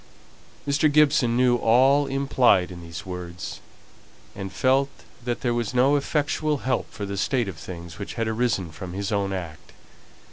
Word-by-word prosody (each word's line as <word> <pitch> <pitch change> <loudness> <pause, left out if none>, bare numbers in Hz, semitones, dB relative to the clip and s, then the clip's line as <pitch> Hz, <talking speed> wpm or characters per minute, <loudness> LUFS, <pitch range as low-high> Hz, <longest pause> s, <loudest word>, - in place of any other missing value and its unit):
Mr. 145 +2 +3
Gibson 140 -5 +4
knew 125 -1 +4
all 135 +5 +4
implied 130 -9 +3
in 85 -1 -9
these 85 +3 -8
words, 90 -1 -6 0.8
and 95 -1 -6
felt 135 +2 +2 0.3
that 120 -1 -2
there 120 -3 +1
was 120 0 -2
no 135 +4 +4
effectual 150 +1 0
help 130 -2 0
for 100 - -5
the 100 0 -5
state 120 +3 0
of 95 -5 -6
things 85 +1 -9
which 100 - -6
had 115 -1 -1
arisen 110 -6 0
from 90 +2 -8
his 100 +2 -3
own 100 -2 0
act. 85 -5 -7
115 Hz, 165 wpm, -24 LUFS, 95-135 Hz, 0.8 s, Gibson